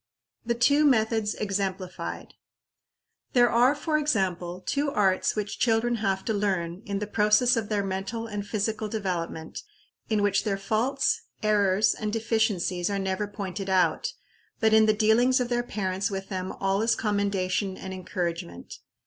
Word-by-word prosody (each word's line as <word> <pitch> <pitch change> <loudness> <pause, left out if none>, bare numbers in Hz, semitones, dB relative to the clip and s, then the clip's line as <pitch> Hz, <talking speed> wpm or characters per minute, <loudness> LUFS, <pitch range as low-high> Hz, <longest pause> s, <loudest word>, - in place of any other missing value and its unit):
The 235 0 -1
two 285 +5 +4
Methods 220 -5 +2
exemplified. 190 -2 -4 1.0
There 245 -1 +5
are, 250 +4 +4
for 305 +1 0
example, 185 - -1
two 285 +1 0
arts 190 -7 +1
which 210 -1 -4
children 235 0 +2
have 195 -3 -1
to 220 - 0
learn, 190 -4 -1
in 200 -1 -2
the 210 - -2
process 210 +4 +3
of 225 -3 -2
their 205 -2 0
mental 195 +4 -3
and 205 -2 -4
physical 215 +1 -2
development, 180 -6 -4 0.5
in 215 -2 +1
which 200 -1 +2
their 200 -3 -1
faults, 225 +7 0 0.2
errors, 205 -1 +3
and 215 -1 -4
deficiencies 215 -5 0
are 200 - -1
never 190 +1 -2
pointed 195 -1 -5
out, 190 - +2 0.5
but 220 -1 +3
in 220 0 +6
the 215 - +5
dealings 235 +5 +4
of 245 -1 -1
their 240 0 +1
parents 195 -3 -2
with 195 -1 -5
them 185 -2 -3
all 195 +1 0
is 225 +1 +2
commendation 200 -2 -1
and 190 0 -7
encouragement. 170 - -5
205 Hz, 155 wpm, -26 LUFS, 190-225 Hz, 1.0 s, in